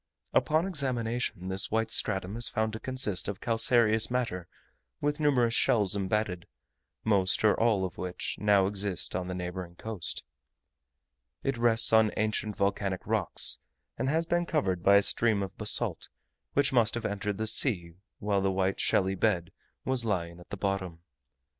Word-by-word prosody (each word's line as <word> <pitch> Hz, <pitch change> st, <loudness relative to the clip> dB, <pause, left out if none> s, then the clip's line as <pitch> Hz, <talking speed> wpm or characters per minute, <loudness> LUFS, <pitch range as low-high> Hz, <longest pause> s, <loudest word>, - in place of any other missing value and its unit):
Upon 155 Hz, +3 st, +2 dB
examination 120 Hz, -, -2 dB
this 95 Hz, 0 st, 0 dB
white 110 Hz, 0 st, -1 dB
stratum 95 Hz, -1 st, +1 dB
is 120 Hz, 0 st, +1 dB
found 110 Hz, 0 st, -1 dB
to 110 Hz, -, -5 dB
consist 130 Hz, -8 st, -1 dB
of 100 Hz, -1 st, -4 dB
calcareous 115 Hz, -1 st, +4 dB
matter 115 Hz, -8 st, -2 dB, 0.5 s
with 145 Hz, +1 st, -1 dB
numerous 125 Hz, -6 st, +2 dB
shells 105 Hz, -5 st, +2 dB
embedded, 95 Hz, -2 st, -2 dB, 0.6 s
most 100 Hz, -3 st, +1 dB
or 105 Hz, -2 st, +5 dB
all 110 Hz, -5 st, +2 dB
of 90 Hz, -, -8 dB
which 90 Hz, -1 st, -4 dB
now 100 Hz, -2 st, +3 dB
exist 100 Hz, -1 st, -2 dB
on 90 Hz, -1 st, -3 dB
the 90 Hz, -, -4 dB
neighbouring 90 Hz, -1 st, -6 dB
coast. 110 Hz, -2 st, -6 dB, 1.2 s
It 135 Hz, -, -1 dB
rests 115 Hz, -1 st, +4 dB
on 110 Hz, -1 st, +5 dB
ancient 110 Hz, -1 st, -2 dB
volcanic 100 Hz, -2 st, -2 dB
rocks, -, -, +1 dB, 0.4 s
and 130 Hz, +3 st, -2 dB
has 160 Hz, +3 st, +1 dB
been 175 Hz, +1 st, 0 dB
covered 95 Hz, -, -1 dB
by 100 Hz, +3 st, +5 dB
a 100 Hz, -, +5 dB
stream 110 Hz, -3 st, +2 dB
of 95 Hz, -, -7 dB
basalt, -, -, +1 dB, 0.4 s
which 140 Hz, -1 st, +1 dB
must 115 Hz, -3 st, +3 dB
have 120 Hz, -, -4 dB
entered 100 Hz, 0 st, -3 dB
the 110 Hz, -, -2 dB
sea 100 Hz, -7 st, +1 dB, 0.2 s
when 100 Hz, -1 st, -1 dB
the 95 Hz, -, +1 dB
white 95 Hz, 0 st, -1 dB
shelly 95 Hz, 0 st, +1 dB
bed 90 Hz, -4 st, 0 dB, 0.3 s
was 130 Hz, -2 st, +1 dB
lying 85 Hz, -6 st, -3 dB
at 90 Hz, -, -16 dB
the 100 Hz, -, -6 dB
bottom. 95 Hz, -4 st, -3 dB
105 Hz, 160 wpm, -29 LUFS, 95-115 Hz, 1.2 s, or